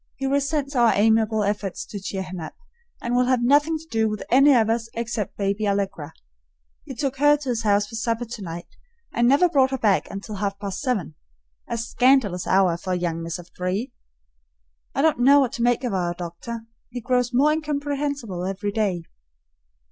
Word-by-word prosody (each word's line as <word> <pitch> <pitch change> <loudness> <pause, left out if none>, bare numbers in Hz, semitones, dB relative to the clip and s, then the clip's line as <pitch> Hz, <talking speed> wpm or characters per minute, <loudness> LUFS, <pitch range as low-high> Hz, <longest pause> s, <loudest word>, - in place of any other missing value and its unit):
He 270 - -4
resents 280 +1 0
our 235 -2 +4
amiable 220 0 +3
efforts 200 -2 -2
to 205 - -7
cheer 190 0 -4
him 180 0 -7
up, 160 - -7 0.5
and 235 +1 -1
will 250 0 +3
have 250 -1 +2
nothing 290 +5 +3
to 315 - -13
do 220 -1 +1
with 215 -1 -4
any 275 +4 +6
of 225 -3 +3
us 230 0 -1
except 230 -3 -3
baby 200 +1 -1
Allegra. 195 -7 -2 0.7
He 265 - -8
took 270 +2 -2
her 290 +1 +5
to 285 -3 -6
his 235 -2 0
house 205 -2 +2
for 215 - -15
supper 230 +1 -1
tonight 185 -7 -7 0.5
and 235 +1 +2
never 285 +8 +5
brought 275 -6 +3
her 265 - -2
back 210 -5 +1
until 200 +1 -7
half 200 0 -2
past 200 -1 -5
seven, 215 - -1 0.5
a 235 - -3
scandalous 235 -5 +2
hour 185 -3 +3
for 185 +1 -3
a - - +1
young 170 -2 -2
miss 165 +2 -4
of 175 0 -13
three. 190 +8 -3 1.0
I 275 - +1
don't 315 -5 +3
know 275 +4 +6
what 260 -4 +1
to 240 - -5
make 245 +1 +2
of 245 -5 -2
our 175 -2 -1
doctor; 175 +7 -6 0.3
he 250 0 -5
grows 250 0 0
more 275 +5 +4
incomprehensible 285 - -2
every 200 +2 -3
day. 200 -5 -1
225 Hz, 195 wpm, -23 LUFS, 195-265 Hz, 1.0 s, any